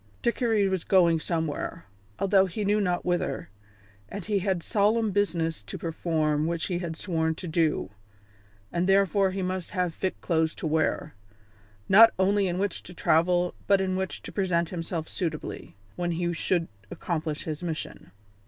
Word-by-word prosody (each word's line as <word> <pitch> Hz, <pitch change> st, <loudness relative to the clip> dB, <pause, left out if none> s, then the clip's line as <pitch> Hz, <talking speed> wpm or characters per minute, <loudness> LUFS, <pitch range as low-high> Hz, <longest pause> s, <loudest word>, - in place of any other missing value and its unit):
Dickory 230 Hz, -4 st, +2 dB
was 190 Hz, -3 st, -1 dB
going 170 Hz, -4 st, +4 dB
somewhere, 160 Hz, 0 st, -3 dB, 0.3 s
although 195 Hz, -1 st, +3 dB
he 200 Hz, +4 st, -3 dB
knew 210 Hz, +1 st, +2 dB
not 180 Hz, -3 st, 0 dB
whither, 175 Hz, -, -1 dB, 0.6 s
and 200 Hz, -2 st, -6 dB
he 210 Hz, -2 st, +1 dB
had 190 Hz, -3 st, -1 dB
solemn 215 Hz, +1 st, +2 dB
business 170 Hz, -5 st, 0 dB
to -, -, -7 dB
perform 155 Hz, -2 st, 0 dB
which 170 Hz, -1 st, -1 dB
he 175 Hz, -2 st, -2 dB
had 170 Hz, -2 st, -4 dB
sworn 160 Hz, -2 st, -1 dB
to 180 Hz, -, -6 dB
do, 160 Hz, -, 0 dB, 0.8 s
and 175 Hz, +2 st, 0 dB
therefore 195 Hz, 0 st, +4 dB
he 190 Hz, 0 st, -3 dB
must 185 Hz, -1 st, -3 dB
have 180 Hz, -2 st, +1 dB
fit 190 Hz, +2 st, -3 dB
clothes 160 Hz, -2 st, 0 dB
to -, -, -6 dB
wear, 155 Hz, -1 st, 0 dB, 0.7 s
not 225 Hz, +3 st, +8 dB
only 195 Hz, +1 st, +3 dB
in 175 Hz, 0 st, -2 dB
which 195 Hz, -1 st, -1 dB
to 180 Hz, -, -12 dB
travel 175 Hz, +2 st, +2 dB
but 200 Hz, -1 st, +5 dB
in 190 Hz, -1 st, 0 dB
which 190 Hz, 0 st, -3 dB
to -, -, -7 dB
present 170 Hz, -4 st, 0 dB
himself 165 Hz, -2 st, -4 dB
suitably 160 Hz, -4 st, -4 dB, 0.2 s
when 175 Hz, -1 st, -1 dB
he 175 Hz, +1 st, -1 dB
should 170 Hz, 0 st, 0 dB, 0.2 s
accomplish 155 Hz, -3 st, -3 dB
his 155 Hz, 0 st, -5 dB
mission. 165 Hz, -3 st, -5 dB
175 Hz, 160 wpm, -27 LUFS, 165-195 Hz, 0.8 s, not